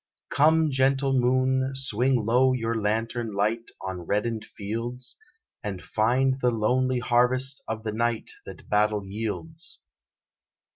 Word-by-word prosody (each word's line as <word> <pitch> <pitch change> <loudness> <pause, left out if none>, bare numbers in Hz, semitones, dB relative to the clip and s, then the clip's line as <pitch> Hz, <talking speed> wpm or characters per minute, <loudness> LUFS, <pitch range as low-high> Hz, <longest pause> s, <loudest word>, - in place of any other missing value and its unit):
Come, 160 +1 +4
gentle 135 +1 +2
moon, 130 +1 +2
swing 130 -2 +1
low 130 +3 +4
your 115 -2 -1
lantern 115 +1 -1
light 110 +3 0
On 95 -2 -4
reddened 105 +5 -1
fields, 115 +5 -5 0.5
And 100 -3 -4
find 130 +7 +1
the 125 - +4
lonely 125 +3 +1
harvest 125 +2 +2
of 110 0 -4
the 110 - -2
night 115 +1 -1 0.2
That - - -10
battle 105 -1 +2
yields. 115 - -3
120 Hz, 125 wpm, -26 LUFS, 110-130 Hz, 0.5 s, Come